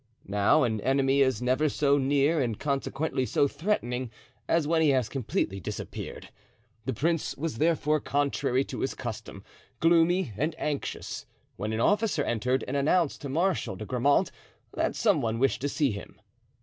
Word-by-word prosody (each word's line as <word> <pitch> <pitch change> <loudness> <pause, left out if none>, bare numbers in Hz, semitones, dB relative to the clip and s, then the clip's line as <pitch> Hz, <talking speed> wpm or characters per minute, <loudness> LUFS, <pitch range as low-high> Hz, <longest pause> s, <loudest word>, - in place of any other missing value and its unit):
Now 100 +9 +3
an 110 -4 0
enemy 135 +2 +2
is 130 -4 +2
never 130 +5 +2
so 140 0 +2
near 140 +3 +2
and 115 -5 -2
consequently 140 -1 -1
so 140 +2 +2
threatening, 130 - -2 0.4
as 165 -3 +2
when 165 0 +2
he 155 - +4
has 130 -5 +2
completely 110 -6 -2
disappeared. 85 - -6 0.6
The 130 - -1
prince 165 +2 -1
was, 150 -6 -3
therefore, 155 -1 +2
contrary 140 -2 0
to - - -7
his - - -2
custom, - - -7 0.4
gloomy 170 -2 +3
and 155 - -1
anxious, 150 -3 -4 0.3
when 105 +1 -3
an 110 +1 -1
officer 205 - +2
entered 125 +3 0
and 130 - -3
announced 150 +3 +1
to 140 - -5
Marshal 155 - 0
de 110 - -7
Grammont 130 +5 +2 0.4
that - - -1
some - - +2
one 115 0 -1
wished 135 +1 +1
to 145 - 0
see 140 -3 +1
him. 100 -2 -9
140 Hz, 160 wpm, -28 LUFS, 125-155 Hz, 0.6 s, he